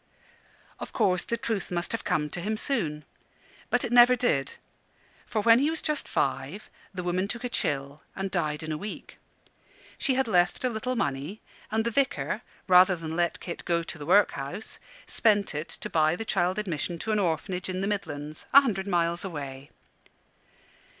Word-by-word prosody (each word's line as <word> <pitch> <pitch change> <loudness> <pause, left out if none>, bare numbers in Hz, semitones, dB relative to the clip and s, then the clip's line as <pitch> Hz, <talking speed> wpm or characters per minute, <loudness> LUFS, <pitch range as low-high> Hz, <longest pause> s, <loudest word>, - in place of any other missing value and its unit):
Of - - -7
course 185 -2 +2
the 235 - -2
truth 220 -4 -2
must 175 -1 -2
have 230 - -3
come 150 -1 0
to 175 - -4
him 215 +4 -1
soon. 160 - -2 0.6
But - - +2
it 240 - -4
never 245 +1 +8
did: 140 - 0 0.7
for 220 -3 -1
when 230 +1 +7
he 285 +3 +2
was 320 0 0
just 300 -1 0
five, 170 +11 -2 0.2
the 185 -2 -5
woman 180 +2 0
took 235 +3 -5
a 245 - -2
chill 140 - -2
and 195 0 -3
died 155 -4 -1
in 160 - -4
a 155 - -3
week. 210 +1 -8 0.8
She 265 - +1
had 265 -1 +1
left 180 0 +2
a 255 - +2
little 245 +2 -2
money; 145 - -2 0.3
and 220 +1 0
the 235 - 0
Vicar, 275 +3 0 0.3
rather 185 0 +7
than 160 -1 -5
let 175 0 0
Kit 170 - -6
go 170 -1 +1
to 165 - -6
the 145 - -7
workhouse, 185 -2 +1 0.3
spent 205 -5 +2
it 150 +2 -4
to - - -5
buy 155 0 +2
the 225 - -5
child 185 -2 +1
admission 175 -4 -2
to 220 +6 -3
an 215 - +2
Orphanage 180 +1 -1
in 185 0 -2
the 195 - 0
Midlands, 155 -7 -4
a 280 - +11
hundred 205 -7 -2
miles 170 -2 +1
away. 140 -6 -6
185 Hz, 185 wpm, -27 LUFS, 160-220 Hz, 0.8 s, a